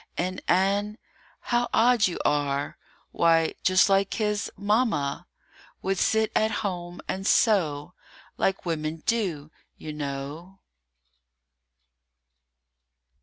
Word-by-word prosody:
And 185 +1 -2
Ann? 200 +3 +1 0.4
How 240 0 0
odd 235 -2 +4
you 180 - -4
are! 145 -1 0 0.3
Why, 165 -1 +3
just 185 +1 +4
like 195 0 +2
his 210 -2 -1
Mamma, 205 - 0 0.6
Would 195 -1 -1
sit 220 0 +2
at 220 - +3 0.2
home 175 -2 -4
and 195 +1 -3
sew, 175 -8 +2 0.4
Like 195 -1 -1
women 155 -1 -3
do, 175 -11 -1 0.3
you 155 - -7
know. 145 +5 -6
185 Hz, 100 wpm, -26 LUFS, 155-210 Hz, 0.6 s, odd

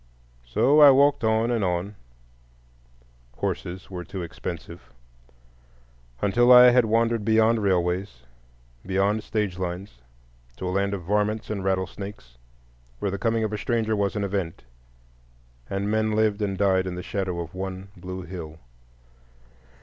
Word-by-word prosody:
So 130 - +3
I 145 - +10
walked 140 0 +4
on 110 +1 +2
and 115 -3 0
on—horses - - -7
were 90 -2 -5
too 90 +1 -6
expensive—until - - -5
I 125 0 +9
had 125 -1 +4
wandered 115 0 +1
beyond 110 +1 +3
railways, 90 -8 -1 0.6
beyond 100 +3 0
stage 105 -5 -2
lines, 90 -5 -5 0.6
to 95 - -4
a - - -1
land 100 +1 0
of 95 - -7
"varmints" 105 +4 -1
and 100 -3 -3
rattlesnakes, 95 - -4 0.6
where 100 +9 -2
the 100 - -4
coming 115 -1 0
of 110 -1 -2
a 105 - -3
stranger 110 0 0
was 100 -1 -1
an 105 - -1
event, 95 -4 -3 1.1
and 100 +1 -2
men 110 0 +1
lived 110 -1 +1
and 100 -2 -1
died 95 -1 +2
in 90 - -4
the 90 - -6
shadow 95 -3 -3
of 85 -1 -6
one 95 +1 -6
blue 95 +1 -7
hill. 85 -3 -8
95 Hz, 135 wpm, -25 LUFS, 80-105 Hz, 1.1 s, I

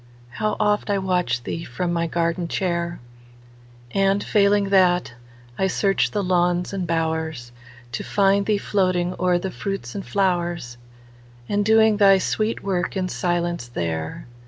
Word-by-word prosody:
How 215 - -1
oft 210 0 +1
I 200 - +2
watch 180 -10 0
thee 165 +7 -4
from 175 +8 -3
my 170 0 0
gardenchair! 170 +1 -1 0.9
And, 195 +3 +2
failing 200 -1 +3
that, 180 -6 +3 0.5
I 190 - +2
search 195 +1 +1
the 205 -1 -2
lawns 180 0 +1
and 185 -3 -3
bowers, 160 -6 -2 0.4
To - - -4
find 200 0 +2
thee 210 -1 +2
floating 185 -3 0
o'er 180 -1 +2
the 185 +2 -4
fruits 195 - -5
and 195 - -5
flowers, 175 - -1 0.7
And 205 0 +1
doing 220 0 +4
thy 195 -2 +6
sweet 215 +4 -1
work 190 -1 -1
in 185 -1 -1
silence 175 -6 -1
there. 80 -7 -4
180 Hz, 140 wpm, -22 LUFS, 170-200 Hz, 0.9 s, thy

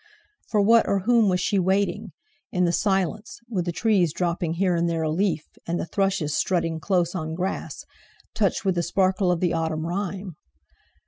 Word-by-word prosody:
For 210 - +1
what 230 +2 +5
or 200 -1 +1
whom 230 0 +3
was 180 -1 +1
she 200 - +1
waiting, 190 +2 0 0.4
in 180 - +1
the 170 - +2
silence, 195 +2 -1
with 190 -7 -2
the 175 - -1
trees 180 -3 +2
dropping 170 -2 -1
here 180 +1 +1
and 170 0 +1
there 165 -1 -1
a 155 - 0
leaf, 165 -2 0 0.2
and 170 +1 -1
the - - -2
thrushes 180 -4 0
strutting 165 -3 0
close 175 -1 0
on 160 -3 -4
grass, 185 +3 -4 0.5
touched 210 -4 0
with 190 - +3
the 175 - 0
sparkle 185 +1 +1
of 175 - -1
the 175 -2 +1
autumn 160 -1 -1
rime? 190 -1 -4
180 Hz, 185 wpm, -24 LUFS, 170-195 Hz, 0.5 s, what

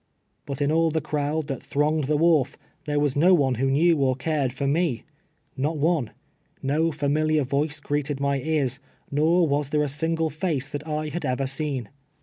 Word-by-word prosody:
But 140 0 -2
in 145 - +1
all 165 +1 +3
the 160 0 0
crowd 150 +1 -2
that 135 -3 -4
thronged 150 +1 0
the 150 +2 +1
wharf, 160 -4 +3 0.3
there 145 -1 0
was 145 -2 +1
no 175 +6 +5
one 135 -6 +1
Avho 135 +2 +1
knew 160 +3 +3
or 130 -2 +2
cared 140 -1 -1
for 135 +3 -4
me. 150 -3 0 0.6
jSTot 150 +4 0
one. 150 -5 +1 0.6
Ko 155 +4 +2
tamiliar 155 0 +1
yoice 145 +3 -1
greeted 145 -1 -2
my 140 0 +1
ears, 140 -3 -1 0.3
nor 160 +4 +3
was 145 -1 0
there 150 0 +1
a - - 0
single 160 +3 -1
face 155 -4 -2
that 145 +2 -5
I 155 0 -2
had 175 +3 -4
ever 130 +2 -1
seen. 135 -3 -2
145 Hz, 185 wpm, -25 LUFS, 140-155 Hz, 0.6 s, no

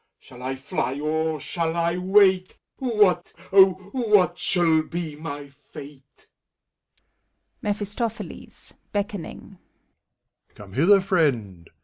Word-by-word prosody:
Shall 125 -1 -15
I 130 +1 -3
fly, 135 0 -3
or 155 +1 -1
shall 165 +3 -2
I 170 0 +1
wait? 185 0 +3 0.2
What, 210 -9 +2 0.2
O 190 -1 +8 0.2
what 210 -8 +2
shall 165 -3 +3
be 160 -1 -5
my 145 -2 -7
fate! 140 0 -14 1.4
MEPHiSTOPHELBS 210 -1 -4 0.2
(beckoning). 200 -1 -5 1.0
'Come 100 -2 -13
hither, 190 - +5
Friend! 120 - 0
170 Hz, 95 wpm, -24 LUFS, 145-200 Hz, 1.4 s, O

